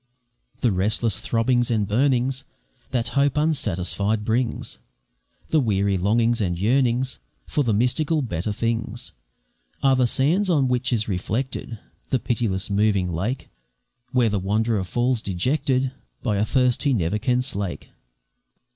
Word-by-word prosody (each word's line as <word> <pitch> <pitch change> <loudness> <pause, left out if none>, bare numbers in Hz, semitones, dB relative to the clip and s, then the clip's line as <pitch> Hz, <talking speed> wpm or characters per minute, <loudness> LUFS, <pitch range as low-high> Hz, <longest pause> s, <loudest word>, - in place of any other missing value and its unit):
The 120 - +3
restless 105 +3 +1
throbbings 120 +1 +1
and 110 -4 +1
burnings 130 +3 +1 0.5
That 120 -3 -1
hope 140 0 +1
unsatisfied 105 - 0
brings, 115 +2 -1 0.7
The 160 - +3
weary 100 -5 +1
longings 115 +5 +2
and 90 -3 0
yearnings 125 +4 +1 0.3
For 145 - +1
the 120 - +1
mystical 145 +8 +1
better 100 -2 -2
things, 115 +2 -2 0.7
Are 135 -1 +5
the 130 -1 +3
sands 170 - +1
on 145 -6 +3
which 125 +1 0
is 110 -3 +1
reflected 110 +5 -3 0.3
The 130 - +2
pitiless 115 -6 -1
moving 100 -3 +1
lake, 110 +11 -3 0.6
Where 125 -3 +3
the 100 -1 0
wanderer 105 +2 0
falls 120 +4 0
dejected, 130 - 0 0.3
By 105 -5 0
a 105 - +2
thirst 125 0 +2
he 140 -2 +2
never 100 +1 0
can 125 0 +1
slake. 100 -7 -4
115 Hz, 135 wpm, -23 LUFS, 105-130 Hz, 0.7 s, Are